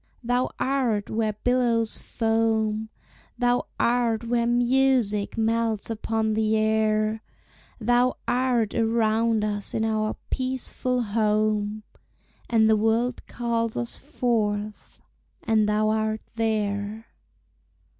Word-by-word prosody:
Thou 245 +2 +1
art 255 -6 0
where 220 -1 0
billows 240 -3 +1
foam, 220 -1 0 0.5
Thou 245 0 +1
art 235 -2 +1
where 235 0 0
music 240 -4 +2
melts 225 -1 0
upon 220 0 -1
the 220 0 +1
air; 215 0 +1 0.6
Thou 245 +2 +2
art 245 -3 +1
around 225 -1 +1
us 205 -1 -1
in 220 - 0
our 215 -1 0 0.2
peaceful 255 -1 -1
home, 215 0 0 0.7
And 225 -2 +4
the 220 - +5
world 225 +3 0
calls 230 -1 -2
us 240 - -1
forth 215 -7 -2 0.4
and 215 -2 +2
thou 215 +1 +2
art 220 0 0
there. 215 -1 -2
225 Hz, 105 wpm, -25 LUFS, 215-240 Hz, 0.7 s, the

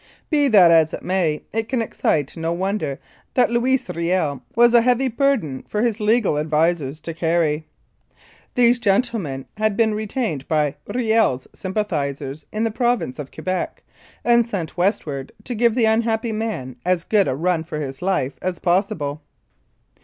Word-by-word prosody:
Be 290 -2 +3
that 195 -9 +7
as 160 -1 +4
it - - -11
may, 175 -5 0
it 225 0 -2
can 260 - 0
excite 150 - -1
no 165 0 -2
wonder 190 -6 -2 0.4
that 250 - +3
Louis 250 +2 +1
Riel 170 -5 -1
was 240 +1 +5
a 235 - +7
heavy 250 +2 +2
burden 235 - 0
for 210 +1 -1
his 230 -2 0
legal 215 -7 +2
advisers 155 -1 0
to 165 - -5
carry. 160 -2 0 0.9
These 240 0 +4
gentlemen 200 - 0
had 215 -1 0
been 225 -2 +3
retained 210 - -3
by 150 -3 0
Riel's 220 - +1
sym 190 0 -6
pathisers 145 -8 -2
in 215 +1 -1
the 225 - 0
Province 240 - 0
of 140 -2 -6
Quebec, 185 0 -4 0.4
and 235 0 +5
sent 200 -8 -5
westward 155 -7 -1
to 245 - -4
give 235 0 +2
the 240 -3 +3
unhappy 225 +1 +1
man 215 - -4
as 180 -1 +1
good 205 0 +2
a - - 0
run 170 +2 0
for 160 -2 -5
his 135 -2 -5
life 180 -8 -1
as 180 -1 -2
possible. 175 -5 0
185 Hz, 160 wpm, -21 LUFS, 155-225 Hz, 0.9 s, that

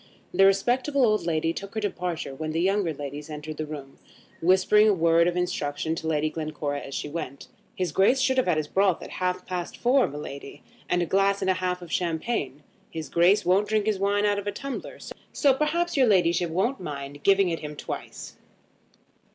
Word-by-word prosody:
The 195 - +6
respectable 250 +8 +2
old 215 -6 +1
lady 165 0 0
took 200 +4 -8
her - - 0
departure 180 -8 -3
when 155 +3 -4
the 165 - 0
younger 190 -1 +1
ladies 145 +1 -7
entered 150 0 -7
the 155 - -4
room, 140 -3 -9 0.4
whispering 190 +4 +5
a 205 - +3
word 170 0 +4
of 175 0 -1
instruction 160 -3 -2
to 160 -1 -5
Lady 155 -1 +1
Glencora 155 -2 -3
as 140 - -8
she - - -3
went. 145 -3 -6 0.3
"His 180 -3 -2
Grace 200 - +3
should 260 0 +2
have 180 -10 +2
his 155 -1 -1
broth 190 -1 +1
at - - -9
half 180 0 -1
past 180 -2 -5
four, 255 +1 +3
my 145 - -7
lady, 140 -1 -8 0.3
and 180 0 +2
a - - -1
glass 195 +3 +2
and 190 - +3
a 185 0 -2
half 180 -1 -2
of 170 - -11
champagne. 160 - -2 0.3
His 160 -1 -6
Grace 185 +5 +4
won't 190 +4 +3
drink 215 -1 +1
his 215 -3 0
wine 205 +1 +1
out 205 -1 +2
of 205 - -7
a - - 0
tumbler, 275 +4 -6 0.4
so 280 -2 +4
perhaps 315 +5 0
your 265 -3 +4
ladyship 175 -4 +3
won't 195 +11 0
mind 145 -3 -7
giving 195 +1 +4
it 165 - -2
him 150 -1 -6
at - - -15
twice." - - -7
180 Hz, 205 wpm, -26 LUFS, 155-205 Hz, 0.4 s, The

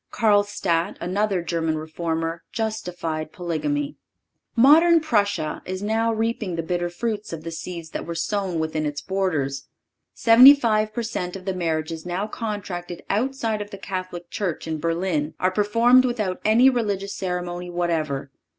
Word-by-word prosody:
(543) - - -12
Karlstadt, 205 -6 +2
another 190 +1 0
German 165 -2 -1
Reformer, 165 +1 -3
justified 180 -8 -3
polygamy.(544) 285 - -2 0.7
Modern 330 +4 +7
Prussia 205 - 0
is 185 +2 -5
now 225 +2 +1
reaping 220 -4 -1
the 165 - -2
bitter 175 +1 -1
fruits 215 +3 -3
of 160 -1 -6
the 165 - -5
seeds 165 0 -7
that - - -5
were 170 - -4
then - - -2
sown 190 -1 -1
within 155 -1 -1
its 145 0 -3
borders. 150 -9 -2 0.5
Seventy 250 +5 +9
five 215 -5 +1
per 235 +2 -3
cent. 180 -5 -4
of 190 -1 -9
the 190 - -1
marriages 160 -2 -2
now 180 +3 -2
contracted 200 -6 -5
outside 225 -1 -1
of 205 - -6
the 200 - -8
Catholic 185 -3 -6
Church 180 -6 -3
in 160 -1 -2
Berlin 165 -2 -1
are 185 - +2
performed 230 +6 +4
without 215 -7 -2
any 225 +4 +5
religious 205 -6 0
ceremony 180 -1 -4
whatever. 160 -6 -2
185 Hz, 155 wpm, -23 LUFS, 165-215 Hz, 0.7 s, Seventy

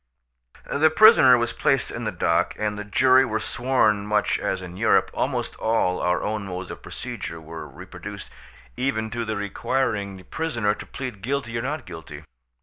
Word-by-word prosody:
The 155 +3 +3
prisoner 155 - +7
was 120 -1 -1
placed - - +1
in - - -5
the - - -1
dock, - - +1
and 105 -1 -1
the 105 - -5
jury 130 +5 +4
were 110 -4 -1
sworn 110 -5 +1
much 105 -1 +1
as 95 - -1
in 90 -1 -9
Europe; 110 +4 +3
almost - - -2
all 110 -5 +1
our 90 0 0
own 105 -1 -3
modes 90 0 -6
of - - -9
procedure 85 - -7
were 80 +1 -8
reproduced, - - -10 0.4
even 110 -5 -1
to 120 -1 -3
the 110 0 -2
requiring 100 0 -1
the 95 - -13
prisoner 115 - -1
to 105 - -9
plead 125 -7 -6
guilty 125 0 -2
or 115 - -1
not 145 +4 -3
guilty. 80 -2 -9
110 Hz, 175 wpm, -24 LUFS, 100-130 Hz, 0.4 s, prisoner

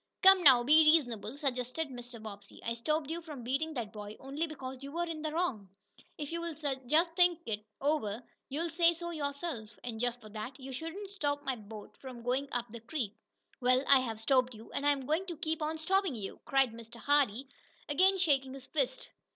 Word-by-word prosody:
"Come 385 0 +9
now, 260 -7 +8
be 305 +5 +7
reasonable," 240 -5 0
suggested 270 +2 -2
Mr. 245 -2 -8
Bobbsey. 205 -2 -10
"I 230 - 0
stopped 305 +5 -1
you 335 +1 -3
from 300 -7 -8
beating 290 +6 -1
that 230 -3 -4
boy 210 0 -8
only 280 +5 -3
because 265 -4 -7
you 275 0 -7
were 340 +3 -1
in 325 -2 -5
the 310 0 -2
wrong. 275 - -1 0.5
If 295 0 -5
you'll 335 -1 -3 0.3
just 330 +4 +3
think 355 -1 +5
it 210 -1 -3 0.2
over, 260 -6 0 0.3
you'll 320 +5 -2
say 335 0 +4
so 345 +1 -5
yourself. 285 -6 -3
And, 230 -3 -5
just 245 0 0
for 215 - -12
that, 220 +6 -7
you 265 0 -7
shouldn't 330 +8 -6
stop 290 -7 -1
my 265 -2 0
boat 210 -1 -10
from 255 -3 -9
going 260 +3 0
up 245 -1 -2
the 235 - -7
creek." 230 -4 -3 0.5
"Well, 255 +1 +3
I 275 -1 +8
have 225 -4 -3
stopped 255 +1 +2
you, 220 +1 -12
and 285 - -1
I'm 280 -2 +2
going 320 +7 0
to 345 -3 -5
keep 320 +1 -2
on 310 +1 -1
stoppin' 370 -1 +1
you!" 200 -4 -6
cried 270 -3 +3
Mr. 230 +1 -11
Hardee, 275 -2 +2 0.4
again 375 +6 +5
shaking 270 -7 +2
his 265 -1 -10
fist. 265 -4 -2
275 Hz, 200 wpm, -32 LUFS, 240-320 Hz, 0.5 s, Come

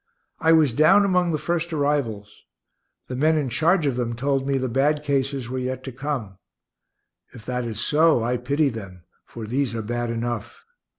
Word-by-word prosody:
I 160 - +3
was 155 -6 +4
down 175 - +5
among 180 -3 +2
the 155 - 0
first 170 +2 -2
arrivals. 140 -9 -2 0.7
The 130 - -5
men 155 +4 +3
in 145 -4 -1
charge 165 +6 +2
of 135 -3 0
them 120 -2 -2
told 135 +2 -1
me 140 -1 +1
the 130 0 -1
bad 145 +5 +1
cases 135 -3 -1
were 130 +1 -3
yet 130 0 -4
to 130 - -6
come. 125 -7 -5 0.9
If 110 -3 -12
that 125 -1 -2
is 110 -2 -5
so, 150 0 +3
I 125 +2 0
pity 140 +4 +1
them, 95 -7 -9 0.2
for 115 - -8
these 125 +2 -1
are 110 - -3
bad 120 +2 -2
enough. 115 -1 -4
130 Hz, 185 wpm, -23 LUFS, 120-150 Hz, 0.9 s, down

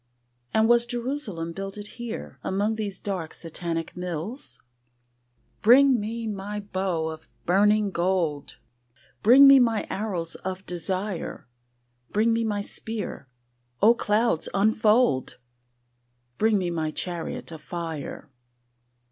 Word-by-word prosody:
And 220 0 +3
was 240 0 +4
Jerusalem 240 - -3
builded 195 +2 -6
here 235 -1 -7
Among 205 +3 0
these 205 -3 -4
dark 185 -6 -4
Satanic 165 0 -4
mills? 180 - -5 1.0
Bring 255 +2 +6
me 225 +2 -4
my 210 0 -4
bow 185 -5 -2
of 160 0 -9 0.2
burning 205 +3 +3
gold: 170 -5 -1 0.6
Bring 265 +6 +8
me 275 0 +9
my 230 -4 +2
arrows 185 -6 -2
of 190 0 -6
desire: 185 +1 -1 0.6
Bring 225 +2 +2
me 230 0 +1
my 210 -2 -1
spear: 210 -8 -5 0.5
O 225 +3 +6
clouds 215 -5 +1
unfold! 215 - +2 1.0
Bring 220 -1 +3
me 180 -2 -1
my 160 -2 -1
chariot 170 +1 -4
of 160 -2 -9
fire. 165 -3 -6
200 Hz, 115 wpm, -25 LUFS, 175-225 Hz, 1.0 s, me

